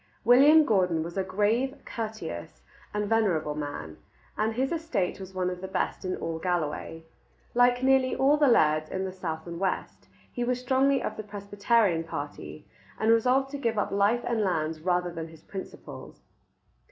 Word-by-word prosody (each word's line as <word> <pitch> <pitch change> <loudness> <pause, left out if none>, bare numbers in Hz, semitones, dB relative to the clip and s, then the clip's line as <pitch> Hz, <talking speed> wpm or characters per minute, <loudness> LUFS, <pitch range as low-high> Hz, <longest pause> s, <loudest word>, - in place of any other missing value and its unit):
William 290 +6 +7
Gordon 180 - +2
was 170 +1 -7
a 195 - 0
grave, 210 +8 0
courteous, 165 - -6 0.3
and 210 0 -2
venerable 190 -9 +1
man, 145 - -6 0.4
and 220 +1 0
his 265 +2 0
estate 285 - -1
was 190 0 -9
one 180 -1 0
of 180 0 -7
the 190 - -5
best 190 - -2
in 185 -1 -2
all 165 -1 -4
Galloway. 165 -2 -3 0.5
Like 245 +1 +3
nearly 265 -1 +3
all 275 +2 +4
the 295 -1 +3
lairds 155 -9 +3
in 190 0 -2
the 190 - -4
south 165 -4 -5
and 170 -1 -6
west, 190 -1 -3 0.2
he 245 - -3
was 250 +1 0
strongly 265 +2 +2
of 215 - -4
the 215 - -5
Presbyterian 205 -2 +1
party, 145 -1 -7 0.3
and 220 +1 +3
resolved 255 +4 +3
to 285 - -5
give 230 -4 -1
up 205 - 0
life 205 +4 +2
and 235 -2 0
lands 160 -5 -1
rather 180 0 0
than 165 -1 -6
his 160 -1 -16
principles. 190 -1 -9
200 Hz, 175 wpm, -27 LUFS, 165-240 Hz, 0.5 s, William